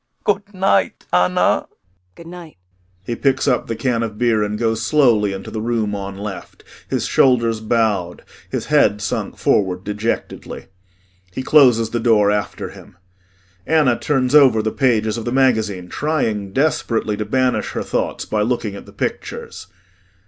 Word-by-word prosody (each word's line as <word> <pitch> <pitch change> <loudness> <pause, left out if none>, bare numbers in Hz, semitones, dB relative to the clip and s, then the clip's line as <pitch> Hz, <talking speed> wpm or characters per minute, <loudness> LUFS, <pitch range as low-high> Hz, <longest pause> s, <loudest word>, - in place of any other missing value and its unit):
Good 205 0 -1
night, 185 - +1
Anna. 90 0 +2
ANNA - - +2 0.5
Good 170 - -13
night. 170 - -11 0.5
[He 120 - -3
picks 135 +2 0
up 125 - +1
the 115 - -3
can 120 0 -1
of 110 -2 -4
beer 115 -2 +2
and 105 0 -2
goes 115 0 -1
slowly 120 -9 +3
into 95 0 -7
the 110 - -4
room 110 -2 -1
on 100 -1 -5
left, 100 -2 -8 0.3
his - - -1
shoulders 115 -4 +2
bowed, 110 -6 -1 0.3
his - - -3
head 105 - +3
sunk 105 - -3
forward 95 -2 +1
dejectedly. 105 +3 -4 0.7
He 130 - -5
closes 125 -6 +4
the 120 - -1
door 110 -3 +3
after 105 -1 -3
him. 90 - -15 0.7
ANNA 150 -7 +3
turns 130 -3 0
over 130 -7 +6
the 110 - -1
pages 110 -4 +1
of 115 - -7
the 120 - -2
magazine, 110 -8 +1
trying 110 - -2
desperately 115 -5 0
to 105 - -2
banish 130 +2 0
her - - -3
thoughts - - -2
by 105 - -1
looking 115 -2 -1
at - - -11
the - - -14
pictures. - - -5
115 Hz, 160 wpm, -19 LUFS, 105-130 Hz, 0.7 s, over